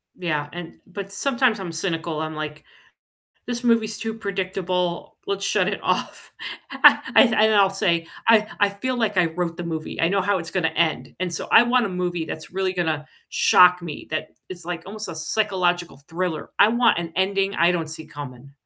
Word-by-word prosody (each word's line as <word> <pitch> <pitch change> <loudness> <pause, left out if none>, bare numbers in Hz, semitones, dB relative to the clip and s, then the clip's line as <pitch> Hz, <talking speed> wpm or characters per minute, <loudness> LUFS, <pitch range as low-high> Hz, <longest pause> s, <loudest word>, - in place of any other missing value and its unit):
Yeah, 150 -5 -2
and 175 -1 -8
but 195 +1 -7
sometimes 240 -1 +1
I'm 180 -3 -5
cynical. 165 -2 -3
I'm 155 0 -4
like, 155 0 -6 0.8
"This 245 0 -4
movie's 225 -2 +2
too 225 -1 -4
predictable. 185 -4 -3
Let's 200 0 -2
shut 195 -1 +2
it 200 - -3
off." - - -2 0.4
I - - +6 0.2
I - - +9
and 230 -4 +3
then 215 0 +4
I'll 195 -1 +5
say, 170 -4 0 0.2
"I 215 -2 +6
I 205 - +5
feel 245 +6 -3
like 210 -4 0
I 180 -2 +4
wrote 170 0 -3
the 175 - -5
movie, 160 -2 -4
I 165 - +3
know 195 +2 +1
how 200 0 +1
it's 165 -1 -7
gonna 175 -4 +1
end." 160 0 -1
And 180 -2 -2
so, - - -5
I - - +9
want 240 -1 +2
a - - -3
movie 175 -2 -2
that's 160 - -7
really 190 0 -1
gonna 160 -4 -2 0.2
shock 180 0 +5
me, 160 -4 -7
that 155 0 -3 0.2
is, 180 -2 -9
like, 175 -1 -4
almost 215 +1 -6
a 170 - -5
psychological 175 -2 -1
thriller. 170 -2 -3
I 210 - +7
want 235 -5 +3
an 165 -1 -5
ending 195 +1 +1
I 170 +2 +4
don't 165 -3 -2
see 160 0 -8
coming. 140 -3 -10
180 Hz, 200 wpm, -23 LUFS, 165-200 Hz, 0.8 s, I